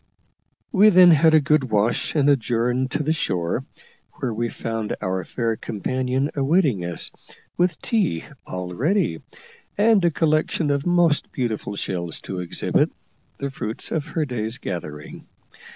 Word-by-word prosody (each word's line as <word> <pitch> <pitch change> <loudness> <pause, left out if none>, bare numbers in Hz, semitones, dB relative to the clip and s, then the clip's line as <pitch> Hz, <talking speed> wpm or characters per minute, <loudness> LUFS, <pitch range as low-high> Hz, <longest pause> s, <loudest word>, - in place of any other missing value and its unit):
We 215 -2 +6
then 180 -3 +8
had 160 0 +5
a - - +7
good 150 -1 +2
wash 110 +3 0
and 145 -2 +3
adjourned 125 -1 +1
to 150 - -1
the 155 +2 +1
shore, 90 - -2 0.5
where 120 -3 -3
we 115 +2 -2
found 115 -2 -3
our 95 0 -2
fair 115 +4 -2
companion 130 +6 -2
awaiting 140 - +2
us 85 -1 -2 0.4
with 175 -2 +1
tea 200 - 0 0.2
all 90 -1 -5
ready, 155 - 0 0.6
and 210 -2 +4
a 170 - +5
collection 155 -1 +1
of 140 +3 -1
most 175 -4 +2
beautiful 110 -5 -3
shells 85 -4 -3
to 95 - -5
exhibit, 90 -1 0 0.5
the 140 0 -4
fruits 110 -4 -4
of 160 -1 -2
her 160 -1 -1
day's 115 -3 -2
gathering. 75 - -7
130 Hz, 145 wpm, -23 LUFS, 105-160 Hz, 0.6 s, then